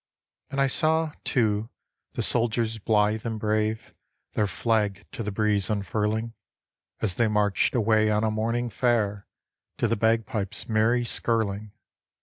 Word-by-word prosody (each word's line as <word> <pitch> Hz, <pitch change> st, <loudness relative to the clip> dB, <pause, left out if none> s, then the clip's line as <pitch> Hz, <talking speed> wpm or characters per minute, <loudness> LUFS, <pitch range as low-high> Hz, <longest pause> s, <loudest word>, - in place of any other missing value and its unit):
And 140 Hz, -, -3 dB
I 135 Hz, -, +4 dB
saw, 160 Hz, +3 st, +1 dB
too, 110 Hz, -4 st, 0 dB, 0.4 s
the -, -, -2 dB
soldiers 115 Hz, -1 st, +1 dB
blithe 105 Hz, 0 st, +1 dB
and 110 Hz, -2 st, -3 dB
brave 110 Hz, +1 st, -1 dB, 0.4 s
Their 105 Hz, -, +1 dB
flag 105 Hz, -2 st, 0 dB
to -, -, -6 dB
the 105 Hz, -1 st, -3 dB
breeze 105 Hz, -1 st, +1 dB
unfurling, 110 Hz, +2 st, -1 dB, 0.7 s
As 100 Hz, -5 st, +2 dB
they 115 Hz, +4 st, +2 dB
marched 105 Hz, 0 st, +1 dB
away 110 Hz, -2 st, +3 dB
on 105 Hz, 0 st, +1 dB
a 110 Hz, -, +1 dB
morning 115 Hz, +2 st, -1 dB
fair 105 Hz, -4 st, 0 dB, 0.5 s
To -, -, +1 dB
the 115 Hz, -, +1 dB
bagpipes' 110 Hz, -1 st, -1 dB
merry 115 Hz, +2 st, +2 dB
skirling. 110 Hz, -3 st, -1 dB
110 Hz, 135 wpm, -26 LUFS, 105-115 Hz, 0.7 s, I